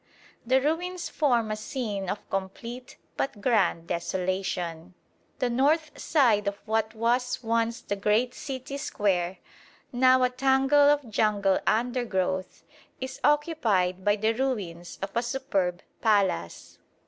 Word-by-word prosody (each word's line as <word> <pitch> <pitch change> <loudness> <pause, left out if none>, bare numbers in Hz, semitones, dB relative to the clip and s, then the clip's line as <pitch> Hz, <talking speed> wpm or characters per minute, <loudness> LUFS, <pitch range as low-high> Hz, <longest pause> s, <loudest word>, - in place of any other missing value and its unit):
The 260 +2 +4
ruins 345 +5 -2
form 240 -7 +1
a - - 0
scene 215 -4 -4
of 205 - -4
complete 230 +7 -5 0.2
but 270 -6 -2
grand 200 -7 +2
desolation. 180 -1 -3 0.4
The 255 - 0
north 300 +5 +2
side 230 -9 +3
of 200 - 0
what 220 0 -1
was 245 +2 0
once 230 +1 0
the 205 - -3
great 215 +5 +1
city 275 -2 -6
square, 190 -8 -1 0.5
now 255 +1 +4
a 250 - +2
tangle 270 +2 +4
of 290 -3 +2
jungle 205 -3 +2
undergrowth, 220 -6 -1 0.4
is 260 0 -6
occupied 225 - +2
by 205 +1 +3
the 220 +2 +1
ruins 200 -10 -3
of 195 - -3
a 235 - +2
superb 215 -8 -1 0.2
palace. 200 - 0
225 Hz, 125 wpm, -27 LUFS, 195-260 Hz, 0.5 s, The